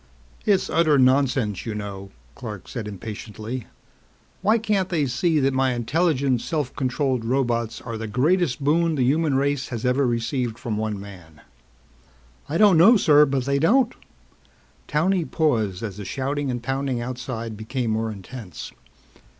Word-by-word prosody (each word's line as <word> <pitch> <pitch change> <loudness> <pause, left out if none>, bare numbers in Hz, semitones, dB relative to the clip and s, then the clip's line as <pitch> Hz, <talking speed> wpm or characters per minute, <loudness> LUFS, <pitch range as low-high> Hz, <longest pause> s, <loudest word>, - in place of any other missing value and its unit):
"It's 195 -3 +3
utter 155 -3 +3
nonsense, 130 -5 +2
you 110 -2 -4
know," 100 -2 -6 0.2
Clark 105 - -8
said 115 -3 -5
impatiently. 110 +3 -6 0.7
"Why 215 +3 +4
can't 210 -4 0
they 160 -5 +1
see 155 +5 +1
that 135 -1 +2
my 130 -1 +1
intelligent, 135 0 +1
self 150 -5 -3
controlled 130 -2 0
robots 120 -2 0
are 115 -2 -6
the 115 - -4
greatest 140 - +1
boon 165 +3 +2
the 130 - +1
human 145 +2 +2
race 140 0 0
has 120 -1 -5
ever 125 +2 +2
received 120 0 -1
from 115 -3 -4
one 110 -1 -2
man?" 90 -6 -12 1.1
"I 160 - 0
don't 195 -4 +6
know, 220 +8 +8
sir, 150 -5 +5
but 135 -2 -1
they 140 0 +1
don't." 240 - +3 0.9
Towney 180 +4 +1
paused 115 - 0
as 105 -3 -5
the 105 - -7
shouting 140 +6 -2
and 120 -1 -3
pounding 135 -1 -1
outside 120 -2 -5
became 115 +2 -3
more 110 +1 -1
intense. 100 - -9
130 Hz, 150 wpm, -23 LUFS, 115-150 Hz, 1.1 s, know